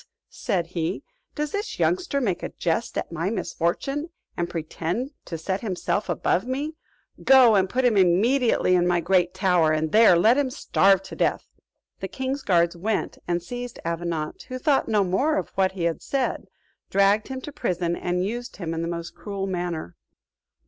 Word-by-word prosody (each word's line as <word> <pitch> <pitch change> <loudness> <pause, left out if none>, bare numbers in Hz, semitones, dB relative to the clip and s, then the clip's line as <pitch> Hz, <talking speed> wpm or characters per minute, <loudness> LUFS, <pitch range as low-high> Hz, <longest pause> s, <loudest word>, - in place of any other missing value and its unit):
said 190 -7 -1
he, 170 +3 -2 0.3
"does 300 -1 -2
this 410 +2 -3
youngster 360 -6 +1
make 200 -10 -1
a - - -4
jest 175 +7 -2
at - - -3
my 170 +3 -2
misfortune, 230 - -2 0.3
and 175 0 -2
pretend 170 - -3
to 165 - -5
set 190 +4 -3
himself 200 -1 -2
above 175 +4 0
me? 285 +5 -2 0.5
Go 260 -4 +7
and 190 -2 +3
put 255 +4 0
him 240 -3 +4
immediately 200 +4 +3
in 175 -1 +3
my 175 -1 +2
great 180 +1 +2
tower, 180 -4 +3
and 155 0 0
there 215 -5 +6
let 225 +10 +4
him 280 -2 +1
starve 195 -7 +3
to 190 - -9
death." - - 0 0.5
The - - -4
king's 265 +2 -3
guards 170 -5 +2
went 205 +5 -2
and 175 -1 -1
seized 245 +4 -6
Avenant 165 -2 -3
who 255 -1 -5
thought 280 +1 +2
no 210 -2 +3
more 265 - +1
of - - -2
what 190 -1 0
he 185 -3 -4
had 170 -1 -1
said, 270 -2 -2 0.4
dragged 200 +2 +3
him 265 -1 -5
to 295 - -7
prison, 175 -8 -1
and 180 +1 -1
used 240 +4 -5
him 165 -4 -4
in 165 - -2
the 165 - -2
most 170 0 -5
cruel 200 -2 -5
manner. 175 - -4
190 Hz, 180 wpm, -24 LUFS, 170-245 Hz, 0.5 s, Go